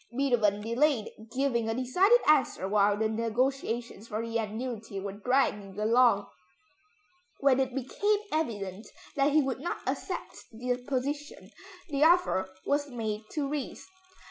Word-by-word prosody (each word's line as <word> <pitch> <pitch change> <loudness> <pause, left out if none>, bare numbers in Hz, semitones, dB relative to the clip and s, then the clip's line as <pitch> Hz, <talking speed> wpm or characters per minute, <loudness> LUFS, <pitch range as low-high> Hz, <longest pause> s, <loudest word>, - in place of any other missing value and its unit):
Beethoven 225 -7 +2
delayed 235 +1 +1 0.2
giving 240 -3 0
a 225 - -1
decided 370 - +4
answer 265 -10 +3
while 205 0 +3
the 220 +1 +1
negotiations 230 0 -2
for 220 +1 -3
the 230 0 -6
annuity 220 -1 -4
were 195 0 -4
dragging 205 -3 0
along. 225 -1 +4 1.1
When 270 -2 +4
it 260 -1 0
became 405 - +1
evident 210 - -3 0.3
that 280 +1 +3
he 305 0 +4
would 265 -1 -2
not 340 +6 -3
accept - - -4
the 245 +2 -2
position, 285 +3 -3 0.4
the 285 0 +1
offer 325 - +4 0.2
was 285 0 0
made 220 -3 -4
to 295 -3 -1
Ries. 290 -1 -5
245 Hz, 135 wpm, -29 LUFS, 215-280 Hz, 1.1 s, decided